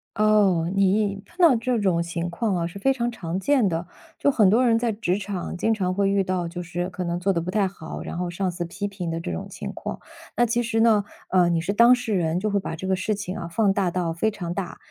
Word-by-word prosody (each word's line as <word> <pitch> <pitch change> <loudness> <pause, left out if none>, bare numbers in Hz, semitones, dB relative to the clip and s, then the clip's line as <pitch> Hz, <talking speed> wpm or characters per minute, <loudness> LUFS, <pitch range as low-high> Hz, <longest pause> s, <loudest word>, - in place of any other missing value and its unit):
哦， 205 -6 +3
你 195 0 +2
碰 350 - -24
到 330 -7 +7
这 235 +1 0
种 180 -5 +1
情 170 0 -3
况 195 +3 -1
啊， 170 -1 -1
是 175 - -9
非 270 +7 +2
常 240 -2 -1
常 180 -5 -4
见 260 -2 +3
的， 170 0 -2 0.3
就 - - +3
很 220 -7 +4
多 225 +7 +4
人 230 -2 +4
在 230 0 0
职 205 -3 -1
场 195 -3 -5
经 225 +5 +1
常 185 -4 -1
会 200 0 +2
遇 195 0 +2
到， 185 -2 -1
就 175 +1 -6
是 175 0 -3
可 185 - -4
能 170 0 -2
做 195 +2 +1
得 170 - 0
不 170 - -5
太 200 0 +2
好， 160 -4 -8
然 - - -6
后 180 -1 -2
上 185 +2 -2
司 175 0 -4
批 185 +4 -4
评 195 -4 -5
的 165 0 -2
这 165 - -4
种 - - -5
情 - - -6
况。 - - -6 0.4
那 240 - +4
其 240 +1 0
实 225 -1 -1
呢， 220 -3 +4 0.3
呃， 180 -2 +4
你 165 -1 +1
是 190 +4 -2
当 235 +4 +7
事 245 -3 -3
人， 170 -2 +1
就 210 +2 -1
会 200 - +2
把 190 - -5
这 185 +4 -6
个 190 - +2
事 190 +3 -1
情 200 -2 -5
啊， 170 - -5
放 195 +3 +2
大 195 -2 +1
到 170 -1 -1
非 195 +7 +1
常 175 -5 -5
大， 180 -2 -5
195 Hz, 285 characters per minute, -24 LUFS, 175-215 Hz, 0.4 s, 到